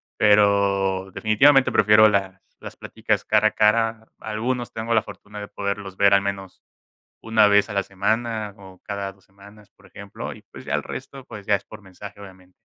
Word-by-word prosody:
Pero, 100 -2 +2
definitivamente 130 +8 +4
prefiero 105 +1 +6
las 100 -2 -1 0.2
las - - -10
pláticas - - -3
cara - - +3
a - - -18
cara, 110 +1 +1
algunos 120 +3 -4
tengo 115 +1 -2
la 110 - +3
fortuna 105 0 -11
de 105 - -7
poderlos 100 -1 -5
ver 100 0 +4
al 100 - +2
menos 95 -2 -6 0.6
una 110 -2 +3
vez 105 +1 +3
a - - -6
la 100 0 0
semana 110 +2 -2
o 95 -2 -15
cada 100 -1 -5
2 95 0 -28
semanas, 100 +2 -18
por 100 - -25
ejemplo, 100 +1 -9
y - - -15
pues - - -12
ya - - -4
el - - -2
resto 135 -1 -9
pues 110 -5 -11
ya 100 - +3
es 100 - -5
por 110 0 -13
mensaje 100 +2 -12
obviamente. 95 -2 -15
100 Hz, 190 wpm, -22 LUFS, 100-110 Hz, 0.6 s, prefiero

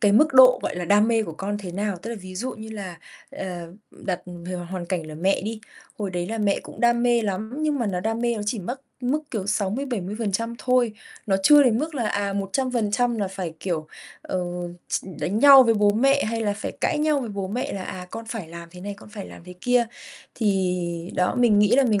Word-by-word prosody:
cái 205 -1 +4
mức 275 +5 +4
độ, 255 -1 +8
gọi - - -2
là, 175 - -2
đam 205 +5 +4
mê 225 -1 +3
của 165 - -6
con 200 +5 -3
thế 180 -4 -7
nào. 200 0 -2
Tức 230 - -5
là 235 - -4
ví 185 0 -9
dụ 250 +7 -3
như 220 -3 -9
là 190 -5 -7 0.3
"Ờ, 190 - -6 0.4
đặt 185 -2 -4 0.3
h 185 - -4 0.2
hoàn 180 -2 -4
cảnh 170 -3 -2
là 155 - -8
mẹ 190 +5 +1
đi, 220 +1 -4 0.4
hồi 200 -3 -2
đấy 175 -1 -2
là 225 +1 -3
mẹ 200 -2 +1
cũng - - -11
đam 240 0 +3
mê 240 -1 +3
lắm 215 +4 -3
nhưng 300 -2 +1
mà 235 - 0
nó 185 -3 -1
đam 225 +4 -1
mê 240 -1 +1
nó 210 - -3
chỉ 215 +1 -1
mất 245 +9 -5 0.2
mức, 265 +5 0
kiểu, 205 -5 -3
60%-70% 215 0 -1
thôi. 250 -3 +2 0.3
Nó 195 - +3
chưa 295 +6 +8
đến 235 -3 +3
mức 310 +1 -3
là, 235 -5 0
à, 200 0 -1
100% 230 +2 0
là 200 -2 0
phải, 185 -4 -5
kiểu, 165 -5 -2 0.4
ờ, 185 - -2 0.5
ch - - -1 0.2
đánh 200 +5 0
nhau 275 0 +10
với 230 -2 +3
bố 205 -1 +4
mẹ 275 +6 +3
hay 225 +1 -2
là 205 -2 +1
phải - - -4
cãi 300 - +1
nhau 300 -2 +2
với 240 - -4
bố 200 -2 -4
mẹ 245 +5 -2
là, 195 - -4
à, 180 0 -6
con 225 +1 -6
phải 220 -9 -5
làm 170 0 -9
thế 180 0 -12
này, 200 +1 -5
con 210 - -14
phải 210 -2 -8
làm - - -12
thế 180 - -9
kia." 245 +1 +3 0.5
Thì 180 -5 -1
đó, 180 - +1
mình 225 -4 +5
nghĩ 210 - +5
là 275 - +5
mình 215 -5 +2
210 Hz, 240 wpm, -24 LUFS, 190-240 Hz, 0.5 s, nhau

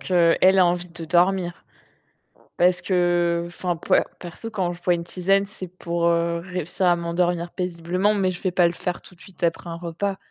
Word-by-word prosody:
qu'elle 180 +1 +4
a 185 - +7
envie 175 0 0
de 170 -1 -8
dormir 175 +1 +1 0.9
parce 180 0 +3
que 175 -2 +1
enfin, 175 0 -3
per 165 - +2 0.2
perso, 180 +6 -8
quand 185 -5 -1
je 175 - -13
bois 180 - +3
une 170 -1 -2
tisane, 195 +3 +1
c'est 195 -2 -8
pour, 170 -1 -2
heu, 170 0 +1
réussir 180 0 -3
à 175 -1 +5
m'endormir 170 0 -1
paisiblement 180 +3 -1
mais 195 -3 +1
je 180 - -8
vais 185 - 0
pas 175 -1 +4
le 170 - -2
faire 175 0 -4
tout 180 - -16
de 170 - -21
suite 190 -3 -13
après 170 +1 -1
un 165 - -5
repas 175 +4 -3
175 Hz, 200 wpm, -23 LUFS, 170-185 Hz, 0.9 s, a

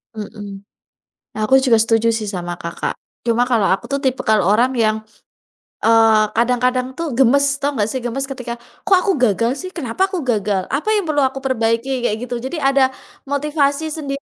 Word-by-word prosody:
Mhm. 205 -2 -8 0.7
Aku 215 +5 +4
juga 245 -4 +3
setuju 225 0 +2
sih 215 -2 -3
sama 175 -3 -4
Kakak. 170 0 -4 0.3
Cuma 240 +1 +1
kalau 230 -5 +2
aku 195 - -2
tuh 280 - -1
tipikal 220 -6 +1
orang 240 +7 +2
yang, 220 -1 +1 0.8
eee, 225 -1 +5
kadang-kadang 250 +2 +1
tuh 330 +3 -4
gemes, 280 +2 +3
tau 285 0 -1
nggak 210 0 0
sih 260 - -3
gemes 270 +3 -3
ketika, 250 -3 -5 0.3
"Kok 400 - +5
aku 395 - +2
gagal 230 -1 +2
sih? 370 - -8
Kenapa 330 +4 -1
aku 375 -3 -3
gagal? 205 -7 -1
Apa 295 +10 -1
yang 415 -2 +1
perlu 290 -3 +2
aku 270 +1 -3
perbaiki?" 245 0 0
Kayak 210 - +1
gitu. 245 -1 -4
Jadi, 280 +6 -5
ada 270 -1 +3 0.3
motivasi 290 +1 0
sendiri 280 -3 -4
250 Hz, 175 wpm, -19 LUFS, 225-275 Hz, 0.8 s, eee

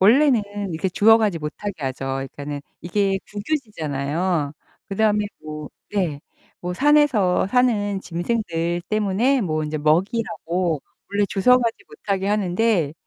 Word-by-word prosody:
원래는 245 +3 +5 0.3
이렇게 165 +4 -1
주워가지 210 -1 +4
못하게 160 +7 -4
하죠. 135 0 -2 0.2
그니까는 145 0 -5 0.2
이게 195 +2 +1
국유지잖아요. 170 - -2 0.4
그다음에 210 +1 +2 0.2
뭐 150 -1 -6 0.2
네. 175 -9 -1 0.4
뭐 180 0 -3
산에서 265 -9 +3
사는 205 -4 +2
짐승들 175 -2 -2
때문에 215 +6 +2
뭐 155 -5 -1
인제 155 0 -3
먹이라고 170 - 0 0.3
원래 205 0 +2
주워가지 235 +3 +3
못하게 200 - -3
하는데 200 -5 +1
195 Hz, 295 characters per minute, -22 LUFS, 165-220 Hz, 0.4 s, 원래는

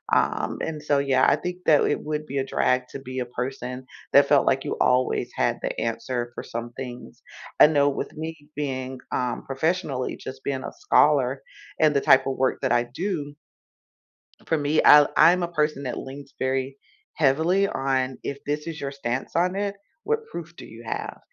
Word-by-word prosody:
Um, - - 0
and 155 -2 -4
so, 145 -2 +1
yeah, 135 -2 +3
I - - +4
think 180 0 -5
that 150 -2 +5
it 145 - +1
would 155 0 -4
be 140 0 -5
a 135 - 0
drag 125 -1 +1
to 140 - -6
be 130 -1 -6
a 125 - -2
person 125 +1 -5 0.3
that 140 0 +7
felt 140 -1 +4
like 135 0 +2
you - - -3
always 125 0 +2
had - - 0
the - - -3
answer 120 +1 -3
for - - -6
some 115 +1 -6
things. 125 -2 -8 0.4
I - - +10
know 145 -2 +3
with 135 - -4
me 160 +1 -5 0.2
being, 130 -3 -4
um, 125 -1 -2
professionally, 140 -1 -1
just 130 0 -9
being 135 -2 -2
a - - -5
scholar, 135 -2 +3 0.4
and 155 -1 +5
the 140 - +3
type 130 -1 +5
of 135 -1 -2
work 130 0 0
that - - 0
I 120 0 +3
do 145 +2 -4 1.1
for 160 - +1
me, 145 +1 +2
I 145 -1 +8
I'm 180 +2 +6
a - - 0
person 150 -4 -1
that 125 - -4
leans 135 +1 -9
very 130 +1 -1 0.4
heavily 165 +7 +3
on, 135 -3 -1
"If 140 - -4
this 150 +2 -3
is 165 -1 -5
your 140 -1 -4
stance 130 0 -4
on 180 +2 +2
it, 200 0 -2 0.3
what 450 +1 -1
proof 170 0 -7
do - - -10
you 115 +1 -12
have?" - - -5
140 Hz, 195 wpm, -25 LUFS, 130-155 Hz, 1.1 s, I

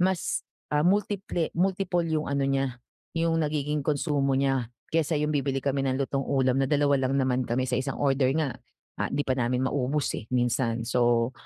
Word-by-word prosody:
mas 185 -1 0 0.2
ah, 150 - +3
multi-ple 195 -1 0
multiple 180 -1 0
yung 155 -1 0
ano 140 0 -1
niya 135 -2 -1 0.4
yung 165 0 +2
nagiging 150 -1 -1
konsumo 140 -2 +1
niya, 135 -3 +1 0.2
kaysa 160 -1 +1
yung 150 +1 0
bibili 140 -2 0
kami 140 0 +1
ng 135 -1 0
lutong-ulam 135 -1 +1
na 135 - +1
dalawa 145 -1 +3
lang 130 +1 +1
naman 130 -2 +1
kami, 125 +2 +1
sa 130 - -4
isang 130 +2 -2
order 135 -2 +3
nga 150 -6 -1 0.4
ah, - - +1
'di 145 - 0
pa - - +3
namin 125 0 0
maubos 140 +2 0
eh, - - -6
minsan. 120 -1 +1
So 120 0 +2
140 Hz, 180 wpm, -27 LUFS, 130-150 Hz, 0.4 s, ah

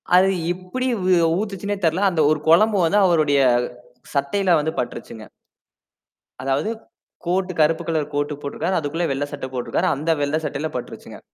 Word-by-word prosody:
அது 185 +1 +6 0.2
எப்புடி 185 +9 -4
ஊ 185 - 0 0.3
ஊத்துச்சுன்னே 205 -1 -3
தெரில. 165 +5 +2
அந்த 165 -3 +1
ஒரு 155 - +1
கொழம்பு 210 +6 +5
வந்து, 200 +5 +3
அவருடைய 155 -5 +3 0.7
சட்டையில 170 +6 +2
வந்து 155 +2 -1
பட்டுருச்சுங்க. 115 -2 -6 1.2
அதாவது 135 +8 0 0.6
கோட் 185 +2 0
கருப்பு 160 +1 +3
கலர் 155 -3 -1
கோட்டு 145 +1 -1
போட்டுருக்கார். 170 +6 -2
அதுக்குள்ள 160 +3 -2
வெள்ள 135 +2 -1
சட்டை 140 -2 -5
போட்டுருக்காரு. 125 -1 -1
அந்த 155 +4 -1
வெள்ள 145 +1 0
சட்டையில 150 +3 -2
பட்டுருச்சுங்க. 125 - -7
160 Hz, 145 wpm, -22 LUFS, 145-185 Hz, 1.2 s, அது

